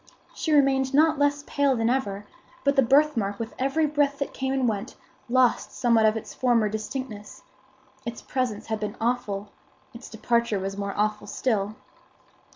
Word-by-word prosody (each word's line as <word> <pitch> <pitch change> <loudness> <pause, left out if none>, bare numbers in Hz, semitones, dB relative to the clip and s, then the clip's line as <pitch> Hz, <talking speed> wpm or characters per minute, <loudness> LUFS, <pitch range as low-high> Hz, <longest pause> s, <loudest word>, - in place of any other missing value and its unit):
She 320 - -3
remained 270 -2 +3
not 310 0 +4
less 285 0 +2
pale 280 -2 +1
than 225 -1 0
ever; 205 -6 -1 0.4
but 280 0 +2
the 270 - +6
birthmark 245 -6 +2
with 230 0 -5
every 275 +4 +1
breath 290 -1 +1
that 280 - -4
came 265 0 -2
and 265 -2 +1
went, 205 -3 -3 0.3
lost 255 0 +2
somewhat 230 -3 +3
of 215 +1 +2
its 220 - -8
former 240 -4 +2
distinctness. 215 0 -6 0.6
Its 235 -1 -6
presence 245 -5 -2
had 220 -1 -3
been 210 -1 -4
awful; 220 -4 -1 0.4
its 235 - -10
departure 235 -1 0
was 195 +1 -4
more 200 0 -4
awful 210 0 0
still. 210 -2 -1
235 Hz, 160 wpm, -25 LUFS, 215-270 Hz, 0.6 s, the